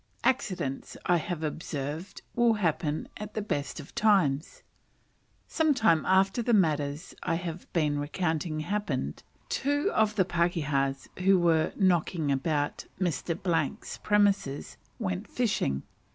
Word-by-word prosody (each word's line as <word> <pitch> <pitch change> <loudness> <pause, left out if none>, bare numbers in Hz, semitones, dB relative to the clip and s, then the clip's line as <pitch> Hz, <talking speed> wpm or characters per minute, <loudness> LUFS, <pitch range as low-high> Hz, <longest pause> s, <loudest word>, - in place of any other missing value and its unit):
Accidents, 180 - -1
I 175 - +4
have 165 0 -3
observed, 155 +2 -4
will 240 -1 +4
happen 160 -5 0
at 210 0 -7
the 215 - 0
best 145 -8 -3
of 145 - -10
times. 180 -9 +2 0.8
Some 315 -3 +2
time 220 -10 +3
after 195 +4 +3
the 235 0 +3
matters 150 -4 +1
I - - 0
have 170 0 -5
been 150 -4 +1
recounting 155 +1 -1
happened, 155 - -2 0.3
two 290 +8 0
of 215 -1 +2
the 190 -3 +3
pakehas, 150 -6 0
who 190 +1 +5
were 165 -2 +3
"knocking 175 -5 +2
about" 145 +1 -1
Mr. 170 -2 -1 0.5
's - - -7
premises, 200 -9 +1 0.2
went 185 -3 -3
fishing. 200 - 0
170 Hz, 125 wpm, -29 LUFS, 150-205 Hz, 0.8 s, who